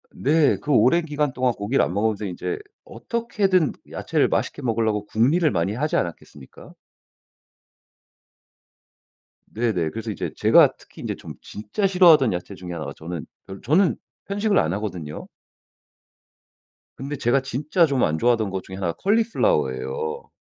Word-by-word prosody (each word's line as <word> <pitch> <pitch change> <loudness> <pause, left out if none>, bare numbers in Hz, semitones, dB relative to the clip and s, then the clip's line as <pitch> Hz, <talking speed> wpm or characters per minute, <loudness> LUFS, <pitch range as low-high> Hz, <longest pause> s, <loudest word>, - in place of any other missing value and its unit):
네. 150 +1 +3
그 150 - -4
오랜 135 +7 +4
기간 150 -3 -1
동안 125 -1 +1
고기를 110 +6 0
안 - - -2
먹으면서 105 +1 0
이제 95 - -4 0.2
어떻게든 195 - 0 0.2
야채를 - - 0
맛있게 - - -2
먹으려고 110 -4 0
궁리를 145 +11 +2
많이 90 +3 0
하지 150 +7 -1
않았겠습니까? 75 -5 -6 2.7
네네. 105 -8 -1
그래서 115 0 -5
이제 100 - -4
제가 - - +5
특히 - - -15
이제 - - -3
좀 - - -10
진짜 110 - -2
싫어하던 170 - +5
야채 90 +3 -5
중에 90 -2 -8
1 80 -2 -5
가 70 - -6
저는 85 0 -6 0.2
별 95 0 -10
저는 175 +5 +3 0.3
편식을 205 +1 0
안 80 - 0
하거든요. 90 -7 -5 1.7
근데 140 +3 -5
제가 130 +1 +1
진짜 150 +7 +1
좀 140 -5 0
안 80 - +1
좋아하던 115 -2 +2
것 95 -1 -4
중에 95 - -9
1 95 -2 -3
가 85 - -1
콜리플라워 230 - +2
예요. 465 0 -5
120 Hz, 310 characters per minute, -23 LUFS, 100-165 Hz, 2.7 s, 제가